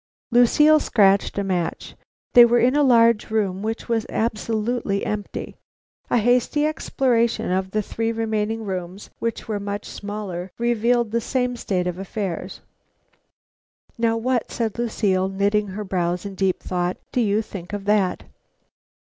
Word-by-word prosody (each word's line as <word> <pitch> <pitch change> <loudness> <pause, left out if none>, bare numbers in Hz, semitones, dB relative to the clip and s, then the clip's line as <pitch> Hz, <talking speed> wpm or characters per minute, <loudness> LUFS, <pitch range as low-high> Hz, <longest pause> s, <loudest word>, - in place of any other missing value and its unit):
Lucile 300 +6 +5
scratched 200 -8 +3
a 200 - 0
match. 180 -4 -2 0.4
They 240 - +10
were 235 0 +4
in 245 +3 +3
a 295 - +4
large 235 -5 +4
room 200 -4 -1
which 220 +2 -4
was 230 -2 -1
absolutely 220 -1 -1
empty. 210 -1 -5 0.5
A - - +3
hasty 245 +6 +2
exploration 240 -9 0
of 190 +1 0
the 215 +2 -1
three 225 +3 -2
remaining 225 0 -2
rooms, 185 0 -6
which 230 -1 -3
were 215 -2 -2
much 200 0 -4
smaller, 200 -3 -6
revealed 235 -1 +1
the 235 +1 0
same 250 +1 -1
state 185 -6 -2
of 180 0 -3
affairs. 195 -2 -5 1.3
"Now 230 -1 +1
what," 245 +1 -1
said 230 -1 -2
Lucile, 195 -5 0
knitting 200 +2 +1
her 200 +2 -5
brows 180 -1 -2
in 200 - -5
deep 190 -1 0
thought, 180 0 -2
"do 250 - +1
you 215 0 +1
think 190 -3 -9
of 205 -1 -5
that?" 205 -3 +1
215 Hz, 150 wpm, -22 LUFS, 195-235 Hz, 1.3 s, They